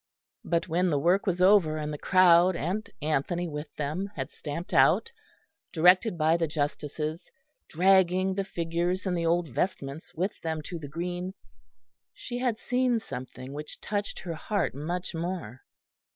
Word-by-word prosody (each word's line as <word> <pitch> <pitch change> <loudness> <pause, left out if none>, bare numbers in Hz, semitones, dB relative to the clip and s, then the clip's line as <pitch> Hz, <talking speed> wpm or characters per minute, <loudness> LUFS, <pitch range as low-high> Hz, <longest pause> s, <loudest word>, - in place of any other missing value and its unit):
But 170 0 0
when 180 +2 +1
the 150 - +1
work 175 +8 +2
was 180 -1 0
over, 185 -6 +5
and 150 0 -3
the - - -4
crowd 180 -1 +5
and 185 +8 -2
Anthony 155 +4 0
with 150 -1 -5
them 155 +7 -3
had - - -4
stamped 155 +3 -6
out, 460 - +4 0.6
directed 180 +4 +4
by 160 +1 +3
the 165 -1 0
justices, 150 +1 -3 0.4
dragging 185 +1 +3
the 195 +1 -1
figures 175 +1 -2
and 185 -2 0
the 170 -1 0
old 170 -1 +1
vestments 140 +1 -3
with 185 +5 -2
them 160 -2 -3
to 170 +2 -6
the 145 - -7
green, 175 +4 -4 0.8
she 245 -1 -5
had 245 -3 0
seen 250 0 +1
something 130 - -8
which 150 +1 -7
touched 205 -1 -3
her 175 -1 -4
heart 195 +4 -1
much 170 +8 -4
more. 165 - -4
170 Hz, 155 wpm, -28 LUFS, 155-185 Hz, 0.8 s, over